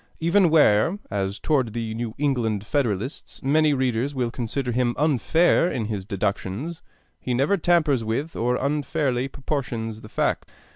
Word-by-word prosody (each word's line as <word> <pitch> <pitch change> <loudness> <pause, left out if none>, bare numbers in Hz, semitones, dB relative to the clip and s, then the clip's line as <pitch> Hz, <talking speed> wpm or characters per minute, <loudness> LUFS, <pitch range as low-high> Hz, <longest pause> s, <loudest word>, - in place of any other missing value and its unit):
Even 170 +2 +4
where, 150 - +4
as 100 0 -2
toward 130 -8 0
the 115 -2 -3
New 115 0 -4
England 120 -8 0
Federalists, 125 -2 -2
many 150 +3 +3
readers 130 0 0
will 125 -3 -1
consider 125 +2 -3
him 120 0 +1
unfair 160 +5 +3
in 115 - -2
his 105 -3 -4
deductions, 100 - -3 0.4
he 125 - -2
never 140 +10 +2
tampers 155 - +2
with 130 +9 -3
or 120 +2 +1
unfairly 140 -2 0
proportions 120 -6 -4
the 110 - -11
facts. - - -1
125 Hz, 145 wpm, -24 LUFS, 110-150 Hz, 0.4 s, Even